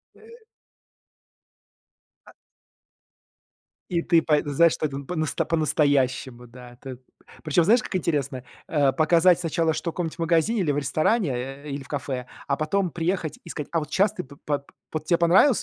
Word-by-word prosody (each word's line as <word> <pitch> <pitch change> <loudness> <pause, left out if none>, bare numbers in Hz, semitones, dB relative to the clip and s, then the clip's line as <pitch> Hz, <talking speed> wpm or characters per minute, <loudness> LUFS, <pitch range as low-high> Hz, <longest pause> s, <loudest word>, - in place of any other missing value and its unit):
Э 440 - -18 2.0
А - - -15 1.6
И 170 -1 +1
ты 170 -1 +3
па 155 -1 +2
знаешь, 155 +3 +4
что - - -2
это 140 -2 -3
по-насто 155 +2 -2
по-настоящему, 135 -6 0
да. 120 0 -13
Т 130 -2 -8 0.5
Причём, 160 +2 +2
знаешь, 230 +4 +5
как - - -6
интересно? 145 -7 -1 0.2
Э, 145 -4 +2
показать 165 +5 +4
сначала, 165 -1 0
что 170 - -3
в - - -22
каком-нибудь 170 -1 -4
магазине 170 +7 +2
или 160 -5 +1
в - - -2
ресторане, 155 - +1
э, 135 +4 -6
или 140 0 -4
в 135 - -13
кафе, 130 -3 -4 0.2
а 140 - 0
потом 175 +4 0
приехать 170 -1 -2
и - - -10
сказать: 150 -3 -6
"А 165 - +1
вот 150 -2 -6
щас 195 +4 +3
ты 185 -4 -5
пы 140 +2 -14
по 145 -1 0
под 140 - -26 0.3
вот 155 -1 -3
тебе 170 +1 +3
понравился?". 185 +10 +4
155 Hz, 175 wpm, -24 LUFS, 140-170 Hz, 2.0 s, знаешь